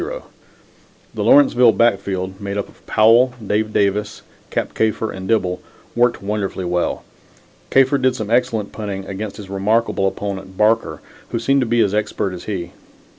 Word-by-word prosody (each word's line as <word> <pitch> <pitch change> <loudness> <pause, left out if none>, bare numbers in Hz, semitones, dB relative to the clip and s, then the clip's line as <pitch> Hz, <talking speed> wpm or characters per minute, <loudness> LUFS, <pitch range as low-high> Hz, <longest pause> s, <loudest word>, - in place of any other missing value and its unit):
The - - -3
Lawrenceville 260 - +5
backfield, 95 -3 0
made 100 0 -4
up 100 - -2
of - - -21
Powell, 120 +4 +4
Dave 105 +2 0
Davis, 105 0 0 0.3
Cap - - -2
Kafer 110 0 0
and 95 0 -7
Dibble, 90 -5 0 0.3
worked 120 -3 +2
wonderfully 100 -2 -3
well. 90 0 -1 0.7
Kafer 135 +1 +4
did 130 -1 +2
some 110 0 -5
excellent 120 -4 +1
punting 100 -3 -5
against 100 +2 -6
his 105 - -9
remarkable 100 +1 +1
opponent 95 -1 -5
Barker, 110 +2 +1 0.3
who - - -2
seemed 135 +4 +2
to 125 - 0
be 120 +1 +2
as 100 - +1
expert 105 -2 -1
as 90 - -8
he. 90 -4 -4
105 Hz, 155 wpm, -19 LUFS, 95-115 Hz, 0.7 s, Lawrenceville